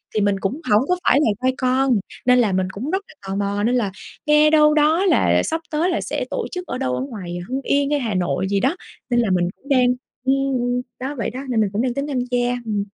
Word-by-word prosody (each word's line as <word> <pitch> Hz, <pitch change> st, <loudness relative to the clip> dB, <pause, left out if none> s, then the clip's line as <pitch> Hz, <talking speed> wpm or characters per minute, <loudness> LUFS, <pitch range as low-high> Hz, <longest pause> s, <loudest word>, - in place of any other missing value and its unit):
thì 215 Hz, -, +2 dB
mình 200 Hz, -1 st, +1 dB
cũng 245 Hz, +12 st, -3 dB
hổng 210 Hz, +3 st, +6 dB
có 360 Hz, -, +4 dB
phải 270 Hz, -, +4 dB
là 220 Hz, -, +3 dB
Gai 260 Hz, -, +3 dB
Con, 255 Hz, 0 st, +2 dB, 0.3 s
nên 250 Hz, 0 st, +5 dB
là 220 Hz, -5 st, +3 dB
mình 185 Hz, 0 st, 0 dB
cũng 250 Hz, +11 st, -5 dB
rất 380 Hz, -, 0 dB
là -, -, -15 dB
tò 195 Hz, -, -3 dB
mò, 200 Hz, 0 st, -1 dB
nên 240 Hz, +3 st, +2 dB
là 220 Hz, -6 st, 0 dB, 0.3 s
nghe 300 Hz, 0 st, +5 dB
đâu 300 Hz, -1 st, +5 dB
đó 310 Hz, +5 st, +3 dB
là 370 Hz, -, +3 dB
sắp 325 Hz, +1 st, -2 dB
tới 315 Hz, +4 st, +1 dB
là -, -, 0 dB
sẽ -, -, -3 dB
tổ -, -, -2 dB
chức 360 Hz, -1 st, -5 dB
ở -, -, -3 dB
đâu 125 Hz, -, -1 dB
ở 125 Hz, -, -2 dB
ngoài 175 Hz, -, -6 dB
Hưng 265 Hz, +1 st, -2 dB
Yên 280 Hz, +1 st, +1 dB
hay 295 Hz, -, +2 dB
Hà 230 Hz, -5 st, -2 dB
Nội 185 Hz, +1 st, 0 dB
gì 200 Hz, -1 st, +1 dB
đó, 270 Hz, -, +1 dB, 0.3 s
nên 240 Hz, 0 st, +2 dB
là 230 Hz, -, +1 dB
mình 175 Hz, -1 st, +2 dB
cũng 280 Hz, -, -18 dB
đang 255 Hz, -2 st, +4 dB, 0.4 s
ưm, 265 Hz, +1 st, +3 dB, 0.2 s
ưm, 245 Hz, +1 st, 0 dB, 0.2 s
đó, 270 Hz, +3 st, -4 dB
vậy 230 Hz, -, -1 dB
đó, 255 Hz, -, -7 dB
nên 225 Hz, -3 st, +2 dB
mình 205 Hz, -, +1 dB
cũng 215 Hz, -, 0 dB
đang 250 Hz, -1 st, 0 dB
tính 280 Hz, +2 st, -3 dB
tham 270 Hz, -3 st, -1 dB
gia. 245 Hz, 0 st, +1 dB, 0.2 s
Ừm. 205 Hz, -2 st, -1 dB
250 Hz, 270 wpm, -21 LUFS, 205-285 Hz, 0.4 s, hổng